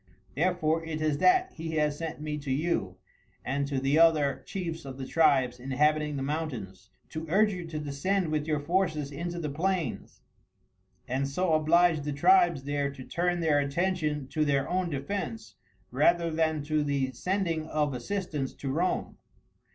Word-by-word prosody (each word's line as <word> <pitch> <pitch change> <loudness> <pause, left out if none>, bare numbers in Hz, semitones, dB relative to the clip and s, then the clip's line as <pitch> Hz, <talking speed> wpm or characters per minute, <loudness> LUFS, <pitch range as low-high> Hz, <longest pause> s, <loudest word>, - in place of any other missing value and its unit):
Therefore 165 0 +1
it 160 -1 -4
is 155 -2 0
that 370 0 +4
he 160 0 -5
has 150 -1 +1
sent 165 -2 -4
me 150 0 -4
to 140 -1 -7
you 130 - -1 0.5
and 140 +1 -1
to 140 -2 -1
the 135 +4 +2
other 155 -4 +4
chiefs 170 -4 -4
of 135 -1 -8
the 135 - -5
tribes 130 -5 +3
inhabiting 150 +3 +1
the 135 - -2
mountains, 125 -11 -4 0.2
to 160 +1 -6
urge 210 +4 +3
you 175 -2 -6
to 160 -1 -5
descend 155 +5 -1
with 155 0 -1
your 155 -2 +1
forces 155 -2 0
into 170 +4 -4
the 165 -3 -3
plains, 170 -3 -2 0.8
and 135 +2 -1
so 165 +4 0
oblige 160 +1 +4
the 145 0 -3
tribes 350 - +4
there 145 0 -1
to 130 -2 -10
turn 175 +4 -1
their 155 -3 +3
attention 150 -1 -1
to 155 +3 0
their 140 -2 +1
own 180 -1 0
defence 200 +10 -4 0.4
rather 170 -1 +3
than 160 -2 0
to 155 0 0
the 140 -2 0
sending 165 +2 -1
of 150 -3 0
assistance 150 0 -3
to 135 - -4
Rome. 175 +6 -1
155 Hz, 165 wpm, -28 LUFS, 140-170 Hz, 0.8 s, that